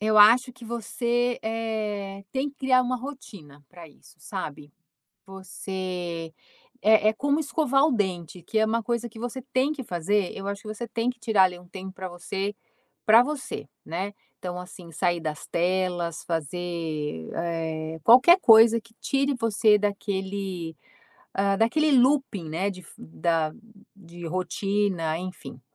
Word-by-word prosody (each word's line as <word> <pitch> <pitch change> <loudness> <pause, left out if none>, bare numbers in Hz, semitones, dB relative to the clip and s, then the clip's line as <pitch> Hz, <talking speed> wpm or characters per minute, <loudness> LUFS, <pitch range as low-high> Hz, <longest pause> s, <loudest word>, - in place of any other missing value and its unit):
eu 215 0 +2
acho 240 +5 +7
que 235 - -14
você, 240 +1 -1
eh, 215 -3 -3
tem 270 +2 -1
que 280 - -13
criar 255 -1 +4
uma 255 0 0
rotina 210 - -10
pra 170 -3 -12
isso, 130 -2 -20
sabe. 150 -6 -6 0.5
Você 185 -3 -5 0.5
é 215 0 +5
é - - +4
como 285 +6 0
escovar 285 -2 +2
o 310 - +3
dente, 185 -6 -2
que 220 - -6
é - - +4
uma 230 +1 0
coisa 235 0 -1
que 225 0 -13
você 245 +2 -5
tem 265 +3 +2
que 295 -3 -6
fazer, 190 0 0
eu 195 - -6
acho 200 0 -4
que 215 - -10
você 235 +2 -5
tem 235 +2 -1
que 250 - -11
tirar 220 -5 +4
ali 180 -1 0
um 180 - -16
tempo 190 +1 -8
pra 185 -1 -6
você, 195 +3 -4 0.5
pra 225 +2 +8
você, 265 - -5 0.2
né. 190 +5 -4 0.2
Então, 180 -1 -5
assim, 180 -2 -11
sair 175 +1 0
das 155 -2 -4
telas, 175 -1 0
fazer, 160 - -3
eh, 160 -1 -3
qualquer 260 - +8
coisa 225 -2 +7
que 225 0 -22
tire 275 +1 +1
você 215 -2 +4
daquele, 195 -4 -3 0.6
hã, 195 0 +2
daquele 305 +8 +3
looping, 260 - +3
né, 185 +6 -1
de 185 -2 -9
f 170 - -16
da 155 - -1 0.4
de 175 -3 -10
rotina, 185 -1 -1
enfim. 175 -8 -8
195 Hz, 155 wpm, -26 LUFS, 175-230 Hz, 0.6 s, pra